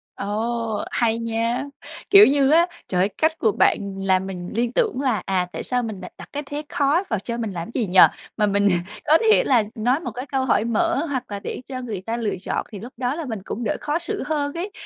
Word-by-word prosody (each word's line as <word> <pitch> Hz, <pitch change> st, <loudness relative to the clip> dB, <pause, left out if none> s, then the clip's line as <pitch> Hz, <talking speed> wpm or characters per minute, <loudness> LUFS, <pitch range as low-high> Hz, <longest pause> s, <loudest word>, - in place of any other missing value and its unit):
Ồ, 220 Hz, +2 st, -2 dB
hay 230 Hz, -1 st, +1 dB
nha! 230 Hz, +2 st, -1 dB, 0.5 s
Kiểu 400 Hz, +1 st, +10 dB
như 275 Hz, 0 st, +3 dB
á, 335 Hz, +3 st, +5 dB, 0.2 s
trời 180 Hz, -, -1 dB
ơi, 195 Hz, -, +2 dB
cách 320 Hz, +1 st, +1 dB
của 220 Hz, -, +2 dB
bạn 200 Hz, 0 st, +1 dB
làm 190 Hz, -1 st, +2 dB
mình 180 Hz, -2 st, -6 dB
liên 235 Hz, +1 st, 0 dB
tưởng 440 Hz, -, +1 dB
là, 245 Hz, -9 st, +1 dB
à, 185 Hz, -2 st, 0 dB
tại -, -, -4 dB
sao 250 Hz, -1 st, -1 dB
mình 215 Hz, -4 st, -5 dB
đ -, -, -7 dB
đặt -, -, -11 dB
cái 290 Hz, +1 st, -3 dB
thế 290 Hz, +2 st, -5 dB
khó 290 Hz, +6 st, +2 dB
vào 220 Hz, -, 0 dB
cho 235 Hz, +3 st, -4 dB
mình 225 Hz, -3 st, -3 dB
làm 175 Hz, +4 st, -6 dB
gì 235 Hz, -6 st, -1 dB
nhỉ? 185 Hz, +1 st, +4 dB, 0.4 s
Mà 210 Hz, -, +3 dB
mình 200 Hz, 0 st, +2 dB, 0.4 s
có 315 Hz, +2 st, +6 dB
thể -, -, +5 dB
là 245 Hz, -5 st, +3 dB
nói 245 Hz, +6 st, +1 dB
một 250 Hz, -8 st, -5 dB
cái 250 Hz, +4 st, -6 dB
câu 265 Hz, -2 st, -1 dB
hỏi 220 Hz, -3 st, +2 dB
mở 330 Hz, +8 st, +1 dB
hoặc 260 Hz, -3 st, -2 dB
là 200 Hz, -, -3 dB
để 210 Hz, -, -6 dB
cho 255 Hz, -1 st, -5 dB
người 215 Hz, -7 st, -5 dB
ta 225 Hz, +4 st, -3 dB
lựa 220 Hz, -4 st, -1 dB
chọn, -, -, -2 dB
thì 205 Hz, -, -7 dB
lúc 240 Hz, +5 st, -10 dB
đó 250 Hz, +1 st, -1 dB
là 330 Hz, -1 st, -4 dB
mình 225 Hz, -5 st, -4 dB
cũng 240 Hz, -, -4 dB
đỡ 220 Hz, -, -1 dB
khó 300 Hz, +3 st, -1 dB
xử 340 Hz, -, -4 dB
hơn 290 Hz, -1 st, -1 dB
ấy. 365 Hz, +4 st, -4 dB
235 Hz, 245 wpm, -22 LUFS, 205-285 Hz, 0.5 s, Kiểu